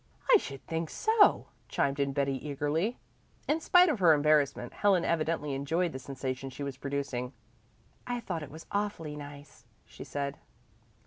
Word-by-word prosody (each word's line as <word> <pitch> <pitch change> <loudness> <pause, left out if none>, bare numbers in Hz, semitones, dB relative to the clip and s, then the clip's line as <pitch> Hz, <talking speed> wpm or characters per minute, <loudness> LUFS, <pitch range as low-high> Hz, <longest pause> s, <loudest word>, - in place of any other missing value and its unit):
"I - - +10
should 135 - -8
think 165 -1 -3
so!" 440 -1 +3 0.2
chimed 140 0 0
in 140 0 +1
Betty 140 0 0
eagerly. 150 - -1 0.5
In 310 - +2
spite 360 +2 +6
of 300 - 0
her 170 -4 +7
embarrassment 145 -4 +2
Helen 195 -4 +3
evidently 155 -3 0
enjoyed 160 +6 0
the 130 - -6
sensation 130 0 -5
she 140 +2 -7
was 140 -1 -4
producing. 135 -2 -3 0.7
"I 245 0 -1
thought 180 -8 -4
it 150 - -7
was 160 +3 -11
awfully 200 -7 -2
nice," 145 0 -11 0.2
she - - -10
said. 140 0 -4
150 Hz, 155 wpm, -30 LUFS, 140-170 Hz, 0.7 s, I